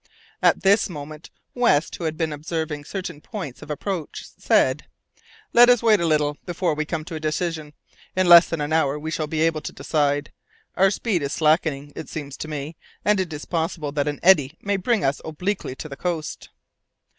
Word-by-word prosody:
At - - +3
this 200 +2 +4
moment, 155 -1 -9 0.2
West, 235 -12 +2
who 170 - -5
had 155 0 -2
been 160 -2 -1
observing 150 -1 -4
certain 175 -3 -6
points 165 - -7
of - - -11
approach, 165 +2 -4
said, 130 +3 +2 0.7
"Let 240 +1 +8
us 245 -2 +4
wait 220 -3 +5
a 170 - 0
little 150 -2 +1
before 175 -1 -1
we 155 +1 -2
come 155 -1 -4
to 170 - -8
a 160 - -4
decision. 155 -1 -3 0.4
In 185 -1 +2
less 175 0 +9
than 165 -2 -2
an 145 +2 -2
hour 150 -3 +2
we 155 +1 -5
shall 155 -1 -2
be 155 +1 -2
able 160 -1 +1
to - - -6
decide. 145 -1 0 0.4
Our 195 +2 +5
speed 195 -2 -1
is 140 0 -2
slackening, 150 -3 +1
it 160 - -7
seems 145 -3 -6
to - - -6
me, 150 +1 -6 0.3
and 210 -1 +3
it 185 -3 -2
is 150 -1 -6
possible 165 -3 -2
that 145 0 -1
an 145 -1 -2
eddy 165 -5 +5
may 200 0 -1
bring 220 +4 0
us 135 +1 0
back - - -10
obliquely 180 -2 -3
to 155 - -7
the 140 - -7
coast." 165 -1 -4
160 Hz, 205 wpm, -23 LUFS, 150-180 Hz, 0.7 s, less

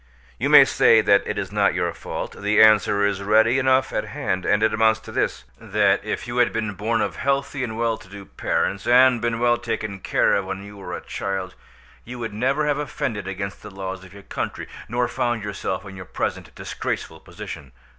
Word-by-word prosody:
You - - 0
may - - +9
say 115 - +5
that 100 -2 +3
it - - -3
is - - -3
not - - +2
your - - -1
fault. - - -6
The 105 +1 +1
answer 105 -2 +5
is 100 -1 -1
ready 110 +5 +3
enough 130 0 +2
at - - -1
hand, 90 0 -3
and 105 +1 +2
it 110 - +3
amounts 110 0 +3
to - - -11
this—that 100 -3 0
if 110 +3 -4
you 120 +1 -4
had 120 - +3
been 110 -2 -2
born 110 +3 -1
of 105 - -2
healthy 140 0 -1
and 110 -3 -4
well 115 -1 0
to 95 - -16
do 100 0 -10
parents, 100 - -2
and 125 0 +5
been 120 -1 0
well 120 0 +3
taken 110 -4 -4
care - - +2
of 100 - +1
when 95 +1 -5
you 100 0 -11
were 100 - -6
a - - -9
child, 95 -1 -4 0.5
you 125 +2 -8
would 115 -3 -5
never 135 +7 0
have 145 -1 0
offended 120 -7 -3
against 100 +1 -5
the 105 - -9
laws 95 -1 -6
of 95 - -14
your 100 0 -13
country, - - -5 0.2
nor 120 +1 0
found 120 -2 -1
yourself 100 -2 -4
in 95 -1 -9
your 95 -1 -9
present - - -4
disgraceful - - -5
position. - - -9
110 Hz, 210 wpm, -23 LUFS, 100-120 Hz, 0.5 s, may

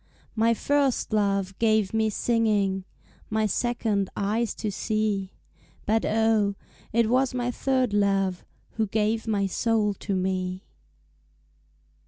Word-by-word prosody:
My 230 +1 +3
first 280 -3 0
love 200 -2 +1
gave 220 -3 +2
me 220 0 +2
singing, 210 -4 +1 0.4
My 220 0 +1
second 215 -2 0
eyes 215 +3 0
to 210 - -3
see, 205 -2 -1 0.5
But 220 +1 +1
oh, 220 -2 +2 0.4
it 230 0 +3
was 255 +2 +2
my 245 0 -1
third 255 -3 0
love 195 -3 +1 0.3
Who 220 -1 +1
gave 220 +2 0
my 205 -3 +1
soul 210 +1 +1
to 195 +1 -4
me. 185 0 -2
215 Hz, 120 wpm, -26 LUFS, 200-230 Hz, 0.5 s, My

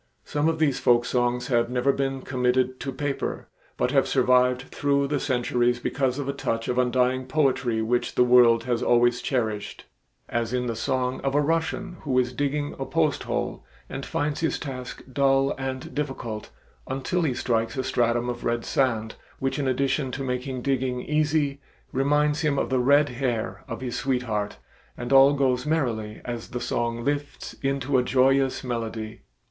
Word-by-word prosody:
Some 150 +2 +1
of 165 - -1
these 150 -4 +1
folk 120 0 +4
songs 125 0 0
have 120 -2 +2
never 125 +2 +2
been 135 -1 -2
committed 130 0 0
to 135 - -4
paper, 140 +1 -3 0.3
but - - +1
have - - +3
survived 125 0 +3
through 140 -1 +1
the 145 0 0
centuries 120 -2 +1
because 130 +1 -1
of 140 -2 -3
a 140 - -1
touch 115 -4 -2
of 125 0 0
undying 125 +1 +1
poetry 130 -6 +1
which 120 +2 0
the - - +5
world 120 -2 +6
has 120 -1 -1
always 120 0 +3
cherished; 110 -6 -2 0.4
as 115 0 -2
in 125 0 0
the 115 -2 -2
song 130 +2 -1
of 135 0 -1
a - - +5
Russian 165 +4 -1
who 135 -4 -1
is 125 0 +2
digging 145 0 -1
a - - -1
post - - +1
hole - - -3 0.2
and - - -6
finds 145 0 -2
his 160 - 0
task 130 -4 -7
dull 135 0 +3
and 130 -1 -4
difficult 135 -7 -4 0.4
until 135 +7 -1
he 145 -7 0
strikes 115 +2 -1
a 130 - 0
stratum 120 -1 +1
of 120 -1 -4
red 120 0 -1
sand, 115 -5 0 0.2
which 135 +2 -2
in 140 - 0
addition 135 +1 0
to 135 - -3
making 125 0 -3
digging 130 -2 0
easy, 150 -2 0 0.3
reminds 145 +3 +2
him 150 -3 +1
of - - -1
the 130 - +2
red 145 +3 +4
hair 120 -3 -2
of - - -6
his 125 -2 -3
sweetheart, 120 -6 -1 0.4
and 120 +2 -3
all 135 +1 +8
goes 130 -2 +1
merrily 115 -9 -1
as 120 -2 -5
the 125 - -4
song 120 0 -2
lifts 145 +1 -3
into 135 -1 +1
a - - +1
joyous 135 +1 +2
melody. 115 -2 -4
130 Hz, 175 wpm, -25 LUFS, 120-140 Hz, 0.4 s, all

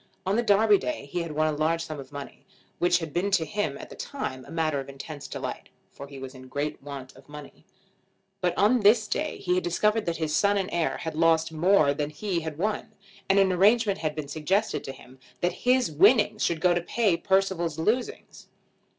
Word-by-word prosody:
On 190 +2 +1
the 235 - +3
Derby 210 -2 +4
Day 125 +2 -4
he 175 +5 -3
had 165 -2 -5
won 155 +1 +1
a 155 -1 0
large 165 +2 0
sum 155 -2 -7
of 135 0 -10
money, 140 -1 -9 0.4
which 175 0 +3
had 165 -3 -6
been 180 +4 0
to 185 -5 +2
him 205 +7 -2
at - - -11
the - - -9
time 130 - -5
a - - -13
matter 155 -3 0
of 135 - -7
intense 140 +2 -8
delight, - - -6 0.2
for 140 - -10
he 140 -1 -11
was 135 0 -8
in 130 -1 -12
great 145 +3 -3
want 135 -2 -9
of 135 +2 -18
money. 150 -1 -12 0.8
But 180 -2 0
on 220 +5 +4
this 215 +1 +4
day 300 +7 -2
he 180 - -1
had 180 - +1
discovered 210 +5 +1
that 165 -1 -1
his 155 -1 -1
son 205 0 +3
and 190 -2 -1
heir 170 -2 0
had 160 - -5
lost 165 0 +2
more 160 -2 +3
than 145 0 -2
he 175 +4 -2
had 160 -2 -6
won, 210 +4 -2 0.4
and 195 - +4
an 195 -1 +4
arrangement 200 +2 +3
had 155 -2 -2
been 155 -2 -5
suggested 180 +9 -1
to 135 - -5
him 130 0 -15 0.2
that 175 - +1 0.2
his 255 -9 +3
winnings 205 - +4
should 165 -2 0
go 180 0 +4
to 175 - 0
pay 205 +1 +1
Percival's 190 -4 0
losings. 245 - -2
170 Hz, 220 wpm, -26 LUFS, 150-200 Hz, 0.8 s, Derby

